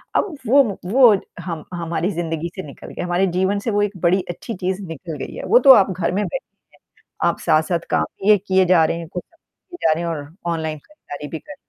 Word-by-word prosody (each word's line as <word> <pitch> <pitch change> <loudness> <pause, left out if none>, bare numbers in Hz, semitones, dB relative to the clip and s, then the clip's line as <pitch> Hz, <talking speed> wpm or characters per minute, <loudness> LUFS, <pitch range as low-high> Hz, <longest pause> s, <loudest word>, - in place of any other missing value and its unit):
अब - - +2 0.2
वो 275 +5 +6 0.2
वो 235 +1 +6 0.3
हम 165 -4 -5
हमारी 170 +2 -2
ज़िंदगी 165 -1 -3
से 190 - -5
निकल 140 - -11
गए - - -5
हमारे 180 +2 +1
जीवन 195 +2 +1
से 225 +2 -2
वो 205 0 +1
एक 205 -1 -3
बड़ी 185 +2 +3
अच्छी 200 +6 -6
चीज़ 185 +1 -2
निकल 160 0 -7
गई - - -10
है - - -6
वो 245 - +6
तो 265 - +12
आप 195 - +4
घर 180 -2 -1
में 205 +3 0
बैठे - - -5 0.6
हैं - - -3
आप - - -6
साथ-साथ 160 +2 +2
काम - - +2 0.2
ये 210 -1 +7
किए 190 -1 +2
जा 175 -3 +5
रहे 165 - -1
हैं 165 - -8
कुछ 180 - -5 0.8
और 145 -3 -4 0.2
ऑनलाइन 160 -2 -3
खरीदारी 150 - -10
भी 160 - -5
कर 295 - -11
180 Hz, 210 wpm, -21 LUFS, 165-205 Hz, 0.8 s, तो